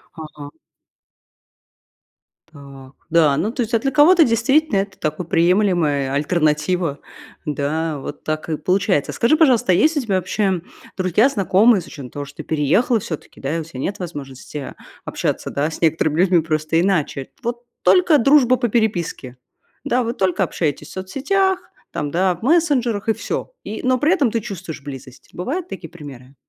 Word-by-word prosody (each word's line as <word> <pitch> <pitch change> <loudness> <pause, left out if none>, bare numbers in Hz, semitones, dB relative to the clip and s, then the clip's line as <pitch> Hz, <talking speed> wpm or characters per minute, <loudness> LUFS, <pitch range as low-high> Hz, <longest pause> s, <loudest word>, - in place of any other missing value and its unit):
Ага. 150 -3 -9 2.0
Так. 140 -3 -13 0.2
Да, 160 -4 +4
ну 215 - 0
то 250 - -3
есть 235 0 -3
а 230 - +4
для 270 +4 -1
кого-то 325 +5 +6
действительно, 255 +3 +2
это 195 0 -3
такая 155 +3 -3
приемлемая 170 -6 +2
альтернатива, 155 +1 0 0.5
да, 150 +1 -2
вот 145 - -8
так 155 +1 -3
и 155 - -1
получается. 185 -2 +1
Скажи, 260 +7 +2
пожалуйста, 255 - +4
а - - +5
есть 310 - +3
у - - +2
тебя 215 -6 -1
вообще 185 0 0 0.4
друзья, 185 +7 +3
знакомые, 205 -2 +3
с - - -13
учетом 135 -4 -9
того, 145 +2 -6
что 140 +1 -15
ты 155 - -6
переехала 160 - +1
всё-таки, 160 -5 -8
да, 140 +4 -2
и - - -2
у - - -4
тебя 150 -5 -10
нет 195 +9 -3
возможности 145 -4 -7 0.3
общаться, - - -2
да, 145 +2 -1
с - - -8
некоторыми 160 -1 +1
людьми 180 -2 +4
просто 155 0 0
иначе, 155 -8 -1
вот, 240 +1 -3 0.2
только 360 -4 +5
дружба 265 -1 +5
по 240 -1 -1
переписке. 185 - -1 0.5
Да? 250 +1 +1
Вы 230 - -2
только 190 -6 0
общаетесь 150 -5 -2
в - - -13
соцсетях, 365 - 0 0.3
там, 145 -1 -3
да, 185 +3 +2
в 170 - -19
мессенджерах, 255 - +2
и - - +4
всё. - - -4
И 215 - -5
но 255 0 +2
при 300 +7 +3
этом 280 -11 +2
ты 230 - 0
чувствуешь 185 -8 -7
близость. 135 -2 -10
Бывают 305 - -3
такие 165 - -8
примеры? 140 -5 -12
180 Hz, 170 wpm, -20 LUFS, 150-235 Hz, 2.0 s, кого-то